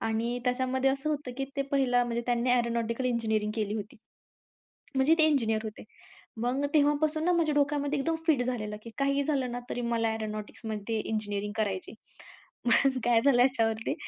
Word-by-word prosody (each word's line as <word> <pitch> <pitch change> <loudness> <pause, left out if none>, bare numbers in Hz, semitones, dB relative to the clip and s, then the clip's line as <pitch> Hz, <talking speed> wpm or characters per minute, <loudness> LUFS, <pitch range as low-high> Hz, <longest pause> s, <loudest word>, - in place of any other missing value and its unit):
आणि 225 +2 -1
त्याच्यामध्ये 260 +1 +1
असं 275 +3 -2
होतं 290 -4 -3
की 270 - -1
ते 275 - +1
पहिलं 250 -3 +3
म्हणजे 235 0 -2
त्यांनी 245 +1 +1
एरोनॉटिकल 235 0 0
इंजिनिअरिंग 220 -3 0
केली 210 -1 -1
होती. 210 0 -6 1.0
म्हणजे 275 +5 +5
ते 315 - +6
इंजिनिअर 225 -8 +2
होते. 215 -1 -7 0.6
मग 255 +4 0
तेव्हापासून 300 +2 +2
ना 360 - +3
माझ्या 330 -4 +2
डोक्यामध्ये 285 0 +1
एकदम 325 +4 0
फिट 285 -6 +3
झालेलं 215 -4 -3
की 230 - -9
काहीही 275 0 +2
झालं 270 -4 0
ना 245 - -3
तरी 245 - -2
मला 230 -1 0
एरोनॉटिक्समध्ये 215 0 -4
इंजिनिअरिंग 205 -1 -3
करायची. 200 -1 -2 0.7
मग 265 +2 +3
काय 235 -1 +4
झालं? 245 -3 +5
याच्यावरती 230 -1 +1
245 Hz, 160 wpm, -29 LUFS, 220-275 Hz, 1.0 s, ते